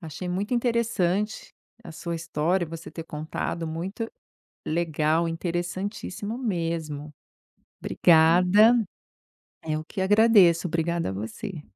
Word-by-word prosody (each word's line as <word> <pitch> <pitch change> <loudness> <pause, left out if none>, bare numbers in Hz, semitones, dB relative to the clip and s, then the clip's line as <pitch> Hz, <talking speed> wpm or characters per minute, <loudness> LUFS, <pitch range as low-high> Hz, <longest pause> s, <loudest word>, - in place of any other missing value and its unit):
Achei 170 +2 -7
muito 200 +7 -1
interessante 225 -4 0 0.3
a - - -10
sua 170 +1 -5
história, 170 +2 -1
você 165 +1 -8
ter 165 - -7
contado. 160 +1 -4
Muito 185 +8 -4 0.6
legal, 160 0 +1
interessantíssimo 180 +5 -4
mesmo. 165 - -3 0.7
Obrigada. 180 +7 +5 0.9
Eu 155 0 -1
que 190 - -8
agradeço, 195 -4 +5
obrigada 170 - -1
você. 115 - -6
170 Hz, 95 wpm, -26 LUFS, 160-200 Hz, 0.9 s, Obrigada